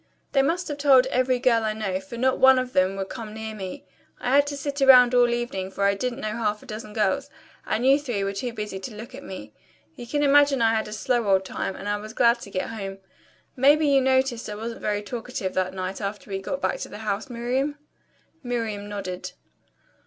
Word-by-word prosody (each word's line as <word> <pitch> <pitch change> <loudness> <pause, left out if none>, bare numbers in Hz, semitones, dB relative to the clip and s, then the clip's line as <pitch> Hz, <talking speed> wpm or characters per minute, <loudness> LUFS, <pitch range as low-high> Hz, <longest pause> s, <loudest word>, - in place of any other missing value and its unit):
They 275 - +4
must 335 +6 0
have 290 -1 -5
told 270 -3 +6
every 255 0 +2
girl 240 -3 +2
I 215 -1 0
know, 200 -4 -2
for 195 +5 -9
not 260 +2 +1
one 265 0 +7
of 255 0 -2
them 185 +1 +2
would 195 -1 -4
come 215 -2 -7
near 220 0 -5
me. 210 +7 -7 0.3
I 250 - -1
had 285 0 +5
to 285 0 -4
sit 280 0 -4
around 250 -2 +8
all 245 -1 +5
evening, 235 -6 -2
for 195 +1 -3
I 200 0 +4
didn't 250 +5 -3
know 215 - -2
half 210 -2 -1
a - - -14
dozen 215 0 -8
girls, 210 -4 0 0.4
and 235 +3 0
you 275 +2 +6
three 240 -9 -2
were 195 0 -2
too 240 +5 -3
busy 210 -4 -5
to 205 +3 -8
look 225 +4 -9
at 270 - -8
me. 110 - -9 0.4
You 240 - -9
can 290 +4 0
imagine 285 -1 +5
I 225 -1 +3
had 220 -1 0
a - - -8
slow 235 +1 0
old 190 -1 +3
time, 190 - -4
and - - -7
I 205 0 0
was 215 +1 -9
glad 235 +1 +4
to - - -9
get 185 -1 -3
home. 195 -3 -6 0.6
Maybe 290 +4 +5
you 280 -2 +4
noticed 260 -3 +1
I 210 - -5
wasn't 230 +2 -6
very 210 0 -1
talkative 230 -2 -4
that 185 0 -1
night 185 +1 -4
after 205 0 -5
we 195 - -2
got 275 +8 -4
back - - -1
to - - -6
the 205 - -8
house, 210 +5 -2
Miriam?" 255 +5 -1 0.6
Miriam 225 -5 -3
nodded. 185 -3 -5
230 Hz, 230 wpm, -25 LUFS, 205-260 Hz, 0.6 s, around